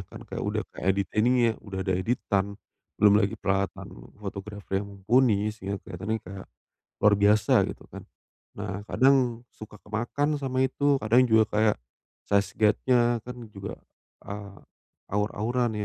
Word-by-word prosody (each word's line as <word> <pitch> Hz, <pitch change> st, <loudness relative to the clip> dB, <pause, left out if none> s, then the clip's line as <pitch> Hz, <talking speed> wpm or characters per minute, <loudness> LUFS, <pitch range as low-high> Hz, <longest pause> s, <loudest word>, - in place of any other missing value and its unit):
Kan -, -, -10 dB
kayak -, -, -5 dB
udah -, -, -1 dB
keedit 95 Hz, +1 st, 0 dB
ininya, 120 Hz, +1 st, +3 dB
udah 100 Hz, -2 st, -7 dB
ada 95 Hz, -, +2 dB
editan, 100 Hz, 0 st, -1 dB, 0.4 s
belum 105 Hz, -1 st, +6 dB
lagi 100 Hz, -, -1 dB
peralatan 95 Hz, 0 st, -1 dB, 0.3 s
fotografer 100 Hz, -1 st, -4 dB
yang 100 Hz, -, -9 dB
mumpuni, 105 Hz, +1 st, +2 dB
sehingga 100 Hz, -2 st, -5 dB
keliatannya 100 Hz, +5 st, -3 dB
kayak 95 Hz, -1 st, -10 dB, 0.6 s
luar 105 Hz, 0 st, +6 dB
biasa, 105 Hz, +1 st, +4 dB
gitu -, -, -7 dB
kan. -, -, -10 dB, 0.5 s
Nah, 100 Hz, 0 st, -5 dB
kadang 125 Hz, -2 st, +3 dB
suka 110 Hz, -1 st, -12 dB
kemakan 130 Hz, +8 st, -1 dB
sama 130 Hz, -2 st, -1 dB
itu, 140 Hz, +2 st, +2 dB
kadang 120 Hz, +4 st, +4 dB
juga 110 Hz, -2 st, +5 dB
kayak 105 Hz, 0 st, +2 dB, 0.5 s
size 100 Hz, -1 st, +2 dB
guide-nya 120 Hz, +3 st, +3 dB
kan 125 Hz, -, -6 dB, 0.2 s
juga, 100 Hz, -1 st, -7 dB, 0.5 s
eee, 100 Hz, -1 st, -8 dB, 0.5 s
awur-awuran, 110 Hz, +4 st, 0 dB
105 Hz, 135 wpm, -27 LUFS, 100-120 Hz, 0.6 s, belum